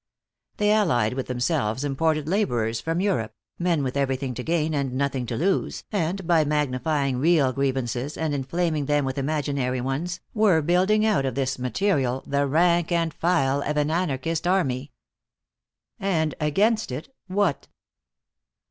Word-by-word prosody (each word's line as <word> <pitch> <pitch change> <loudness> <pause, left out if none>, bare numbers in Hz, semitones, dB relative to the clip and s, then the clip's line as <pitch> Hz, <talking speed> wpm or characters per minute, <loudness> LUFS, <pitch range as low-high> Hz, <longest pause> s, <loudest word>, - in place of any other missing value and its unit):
They 210 0 +2
allied 155 - +2
with 130 0 -4
themselves 125 -1 -1
imported 155 +2 0
laborers 120 - 0
from 165 +2 -1
Europe, 115 - -1 0.2
men 170 -4 +1
with 130 0 -3
everything 135 -1 -1
to 125 - -5
gain 160 +2 0
and 140 -3 -1
nothing 135 -2 -1
to 120 - -3
lose, 190 +4 0
and 190 -1 -1
by 165 -2 +4
magnifying 145 -2 0
real 145 -3 +3
grievances 130 0 -2
and 160 -2 -1
inflaming 150 +2 -1
them 145 -1 +2
with 130 +1 -2
imaginary 140 -3 -1
ones, 150 +8 -3
were 200 -8 +3
building 190 +6 +3
out 210 -10 +2
of 130 -3 -2
this 135 -1 -1
material 130 - 0
the 140 0 0
rank 170 +3 +2
and 165 -2 +1
file 145 -5 +1
of 150 +1 -2
an 150 +1 +1
anarchist 165 -1 -1
army. 145 -7 0 1.1
And 165 -7 0
against 205 - +1
it, 145 - -6
what? 190 -5 0
150 Hz, 150 wpm, -24 LUFS, 130-175 Hz, 1.1 s, by